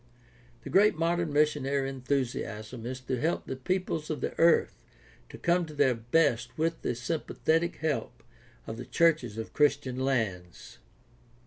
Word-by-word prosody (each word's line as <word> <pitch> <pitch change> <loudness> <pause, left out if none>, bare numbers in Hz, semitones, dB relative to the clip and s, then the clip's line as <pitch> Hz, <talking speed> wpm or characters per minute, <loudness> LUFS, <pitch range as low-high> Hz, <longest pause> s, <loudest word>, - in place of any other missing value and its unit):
The - - -7
great 205 +2 +5
modern 170 0 0
missionary 145 -2 +1
enthusiasm 125 -4 -3
is 130 +1 -4
to 130 0 -3
help 165 +3 0
the 130 - -4
peoples 160 +2 -2
of 155 -3 -2
the - - -3
earth 170 0 +4 0.5
to - - -10
come 175 +1 +2
to 155 - -10
their 140 -3 +4
best 120 +1 +1
with 165 +1 -1
the 120 - -1
sympathetic 160 +5 -1
help 155 -3 -3 0.4
of 110 - -6
the 125 - -7
churches 130 -6 +2
of 110 - -6
Christian 140 -3 +1
lands. 110 -10 -2
140 Hz, 145 wpm, -29 LUFS, 125-160 Hz, 0.5 s, great